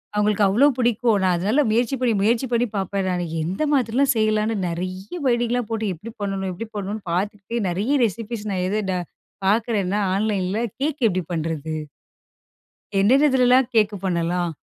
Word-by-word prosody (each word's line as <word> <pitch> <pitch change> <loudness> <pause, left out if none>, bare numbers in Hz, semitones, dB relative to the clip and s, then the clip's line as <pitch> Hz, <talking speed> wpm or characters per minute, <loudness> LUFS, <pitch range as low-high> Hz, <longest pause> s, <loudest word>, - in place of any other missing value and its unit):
அவுங்களுக்கு 210 0 +2
அவ்வளோ 225 +9 +4
பிடிக்கும். 235 -2 +2
நான் 185 -1 +3
அதனால 210 +11 +2
முயற்சி 240 +4 +1
பண்ணி 245 -3 +2
முயற்சி 230 +5 +2
பண்ணி 240 +1 +2
பாப்பேன், 195 0 -1
நானு. 180 -1 -1 0.2
எந்த 180 - -3
மாதிரிலாம் 260 +1 +2
செய்யலான்னு, 215 0 +1
நெறைய 185 - -5
வேடிங்லாம் 240 -1 0
போட்டு 220 -3 -1
எப்படி 220 +8 -10
பண்ணனும்? 195 -1 -2
எப்படி 225 +6 -6
பண்ணனும்ன்னு 200 -1 -4
பாத்துகிட்டே, 205 +4 -2
நெறய 210 +11 0
ரெசிப்பீஸ் 225 +1 -4
நான் 180 -2 -1
எது 210 +3 0
ட - - 0 0.5
பாக்குறேன்னா, 210 -2 +1 0.2
onlineல, 200 -2 0 0.2
கேக் 295 +2 -1
எப்டி 185 -3 0
பண்ணுறது? 160 -2 -3 1.3
"என்னன்னதுல்லலாம் 255 +2 +4
கேக்கு 210 -2 +3
பண்ணலாம்?" 175 -1 0
210 Hz, 145 wpm, -22 LUFS, 185-235 Hz, 1.3 s, அவ்வளோ